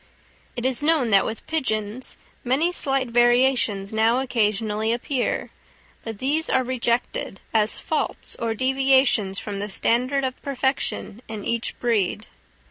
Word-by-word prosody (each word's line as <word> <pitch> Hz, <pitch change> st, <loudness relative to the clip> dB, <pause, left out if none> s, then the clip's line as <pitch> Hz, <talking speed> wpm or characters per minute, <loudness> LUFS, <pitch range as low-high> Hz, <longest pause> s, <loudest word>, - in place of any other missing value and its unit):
It 240 Hz, 0 st, -4 dB
is 260 Hz, 0 st, +1 dB
known 295 Hz, -6 st, +2 dB
that 195 Hz, -1 st, +4 dB
with 220 Hz, -, -6 dB
pigeons 235 Hz, -6 st, -2 dB, 0.3 s
many 275 Hz, +8 st, +2 dB
slight 270 Hz, -7 st, -1 dB
variations 240 Hz, -4 st, +2 dB
now 225 Hz, +3 st, +3 dB
occasionally 220 Hz, -3 st, 0 dB
appear, 245 Hz, +2 st, -2 dB, 0.5 s
but 225 Hz, -2 st, -6 dB
these 295 Hz, +7 st, 0 dB
are 260 Hz, -, +2 dB
rejected 240 Hz, -5 st, -2 dB
as 215 Hz, -1 st, +3 dB
faults 310 Hz, -, -2 dB
or 225 Hz, -1 st, -1 dB
deviations 260 Hz, -5 st, +2 dB
from 200 Hz, -1 st, -5 dB
the 205 Hz, +1 st, -3 dB
standard 255 Hz, +7 st, +1 dB
of 260 Hz, -1 st, -3 dB
perfection 265 Hz, -5 st, -2 dB
in 215 Hz, -2 st, -6 dB
each 235 Hz, 0 st, -2 dB
breed. 215 Hz, -3 st, 0 dB
240 Hz, 130 wpm, -23 LUFS, 220-265 Hz, 0.5 s, that